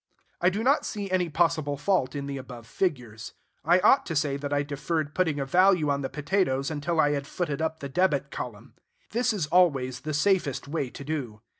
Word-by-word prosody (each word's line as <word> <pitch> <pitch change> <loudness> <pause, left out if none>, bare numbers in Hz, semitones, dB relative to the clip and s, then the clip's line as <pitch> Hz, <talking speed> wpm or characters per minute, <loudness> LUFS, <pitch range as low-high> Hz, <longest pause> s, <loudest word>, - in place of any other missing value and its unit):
I 180 - +5
do 205 +4 -3
not 275 +4 +3
see 200 -3 -5
any 180 -2 +1
possible 155 -3 +1
fault 150 -3 0
in 140 -1 -3
the 140 0 -4
above 125 -3 -9
figures. 120 - -3 0.3
I 175 +5 +4
ought 270 - +5
to 165 - -3
say 145 -2 +1
that 140 0 -5
I 145 0 +1
deferred 150 +2 -3
putting 160 -6 0
a 135 - -1
value 180 0 +4
on 140 0 -1
the 135 - -3
potatoes 145 -2 0
until 155 +2 -2
I 145 -1 +4
had 140 -1 -2
footed 160 -3 -3
up 160 0 -2
the 140 - -4
debit 145 -4 +1
column. 120 +1 -7 0.4
This 240 +2 +1
is 200 -8 -1
always 140 -7 +2
the 150 +3 -4
safest 150 -6 +1
way 145 -3 -2
to 140 - -9
do. 135 -8 -4
145 Hz, 205 wpm, -27 LUFS, 140-175 Hz, 0.4 s, I